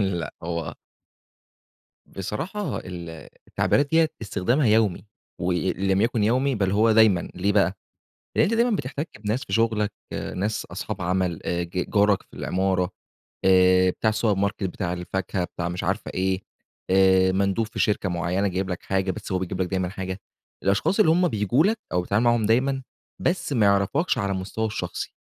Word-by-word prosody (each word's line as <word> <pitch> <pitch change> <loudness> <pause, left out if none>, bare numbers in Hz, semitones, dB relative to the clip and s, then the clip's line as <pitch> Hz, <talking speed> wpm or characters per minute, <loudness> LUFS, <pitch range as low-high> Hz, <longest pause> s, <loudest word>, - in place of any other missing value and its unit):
لأ 95 -4 -1
هو 85 -1 -3 1.3
بصراحة 160 - -4
ال 85 -3 -8 0.2
التعبيرات 145 0 +1
ديّة 160 0 +4
استخدامها 115 +6 +1
يَومي، 110 -3 +2 0.3
وإن 90 +1 0 0.2
لم 95 0 +3
يكن 115 0 +1
يَومي 130 +5 +2
بل 100 -4 0
هو 110 +3 +4
دايمًا، 110 -5 +5
ليه 100 +3 0
بقى 100 -1 +2 0.6
لأن - - +5
أنت 220 - +1
دايمًا 235 -1 +2
بتحتكّ 140 - -5
بناس 110 +5 -2
في - - -9
شغلك 110 -2 +1 0.4
ناس 105 +3 -2
أصحاب - - -5
عمل 90 -1 0
آآ 85 0 -1
ج 90 +1 -3
جارك 105 -2 +3
في - - -20
العمارة 95 -1 0 0.5
آآ 95 0 +5
بتاع 110 - 0
السوبر 105 -2 +1
ماركت 100 0 -1
بتاع 90 -1 -2
الفاكهة 90 +1 -3
بتاع 85 0 -4
مش 90 +2 -4
عارفة 100 +4 -2
إيه 95 +1 0 0.5
آآ 95 0 +5
مندوب 100 +3 +1
في 110 - -9
شركة 105 -2 +1
معيّنة 90 +3 0
جايب 95 +1 -2
لك 90 - -4
حاجة 95 0 0
بس 95 - -6
هو 95 - +1
بيجيب 90 0 -4
لك - - -1
دايمًا 95 -1 -1
حاجة، 95 0 -5 0.4
الأشخاص 100 - +2
اللي 195 - +5
هُم 175 +2 +3
بييجو 110 - +2
لك 220 +4 +2
أو 90 - +1
بتتعامل 100 +6 +1
معاهم 120 -2 +3
دايمًا 135 +4 +2 0.4
بس 175 -4 -1
ما 115 -6 +3
يعرفكش 100 - +2
على 100 -3 -1
المستوى 95 +4 -2
الشخصي. 110 - -5
100 Hz, 170 wpm, -24 LUFS, 95-115 Hz, 1.3 s, دايمًا